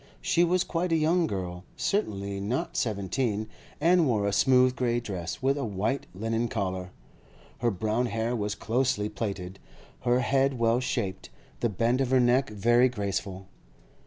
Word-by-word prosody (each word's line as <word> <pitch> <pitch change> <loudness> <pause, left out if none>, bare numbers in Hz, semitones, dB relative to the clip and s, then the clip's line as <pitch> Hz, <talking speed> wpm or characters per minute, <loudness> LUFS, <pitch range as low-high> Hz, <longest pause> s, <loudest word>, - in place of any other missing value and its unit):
She 170 - +2
was 180 +1 +2
quite 175 0 -2
a - - +4
young 165 +2 +2
girl, 90 -5 -4
certainly 100 - -1
not 105 +7 -2
seventeen, 110 0 -1 0.3
and 170 0 +4
wore 105 -5 +1
a 100 - 0
smooth 130 +1 +4
grey 120 -2 +1
dress, 95 - -5
with 135 +2 +2
a - - -2
white 110 +5 -2
linen 115 +3 -1
collar; 95 -4 -3 0.7
her 120 - +2
brown 110 +4 0
hair 115 +2 -1
was 105 -2 -2
closely 115 -2 0
plaited, 100 -4 -5 0.4
her 125 +1 +2
head 135 0 +2
well 115 +1 +2
shaped, 120 -7 -3 0.3
the 120 - +1
bend 115 +6 +1
of 130 - 0
her 130 0 +4
neck 125 +2 +3
very 120 +4 +3
graceful. 100 -4 -3
115 Hz, 160 wpm, -28 LUFS, 100-130 Hz, 0.7 s, a